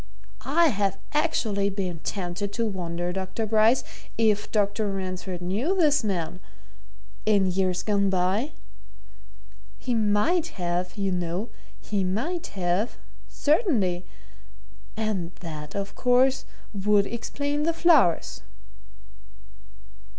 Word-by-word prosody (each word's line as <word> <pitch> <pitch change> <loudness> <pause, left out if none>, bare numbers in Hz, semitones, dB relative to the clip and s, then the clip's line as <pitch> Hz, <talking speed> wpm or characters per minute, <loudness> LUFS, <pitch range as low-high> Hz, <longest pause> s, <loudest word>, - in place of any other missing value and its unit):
I 330 +3 +5
have 195 -4 0 0.2
actually 225 -10 +1
been 185 -4 -3
tempted 190 +2 -3
to 230 - 0
wonder, 175 -3 -3
Dr. 190 +4 -3
Bryce, 220 +3 +4 0.3
if 215 -2 +2
Dr. 205 0 +1
Ransford 185 -2 -4
knew 220 - 0
this 300 -7 +3
man 180 -4 -2 0.9
in 205 -3 +4
years 185 -1 0
gone 200 -2 +2
by? 190 +9 +1 1.2
He 250 - -2
might 225 - +2
have, 180 +1 -2
you 195 -1 0
know, 180 +4 -2 0.3
he 200 -2 -1
might 260 - -2
have 180 +6 0 0.3
certainly! 215 - +1 0.9
And 200 -6 -2
that, 155 -2 -7
of 200 0 -3
course, 255 +1 +3 0.3
would 205 0 +3
explain 285 +6 -2
the 325 +2 +2
flowers." 285 - +3
200 Hz, 105 wpm, -26 LUFS, 180-235 Hz, 1.2 s, I